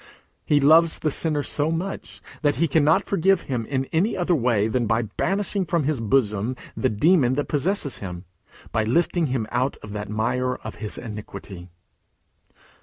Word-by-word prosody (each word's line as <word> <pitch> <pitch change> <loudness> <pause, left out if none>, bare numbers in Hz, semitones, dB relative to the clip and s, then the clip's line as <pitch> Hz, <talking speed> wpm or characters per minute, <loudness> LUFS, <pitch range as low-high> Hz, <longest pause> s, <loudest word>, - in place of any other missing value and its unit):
He 150 - +3
loves 160 +3 +5
the 155 - -1
sinner 150 -1 0
so 150 +1 0
much 175 +4 -5 0.2
that 145 -1 +2
he 165 +3 +2
cannot 160 +5 +3
forgive 195 -1 +2
him 120 -5 -3
in 135 -1 -1
any 190 +8 +1
other 175 -1 +1
way 120 -7 +2
than 120 0 0
by 115 +2 +1
banishing 195 - -1
from 170 -2 0
his 145 -2 0
bosom 110 0 +1 0.2
the 130 - +1
demon 130 - +3
that 145 - -1
possesses 150 0 0
him, 90 -2 -7 0.5
by 110 - +1
lifting 165 +7 +1
him 125 -4 -1
out 125 +3 0
of 105 - -8
that 105 0 -5
mire 125 +4 0
of 110 - -9
his 105 - -4
iniquity. 100 -5 -8
135 Hz, 170 wpm, -24 LUFS, 110-165 Hz, 0.5 s, loves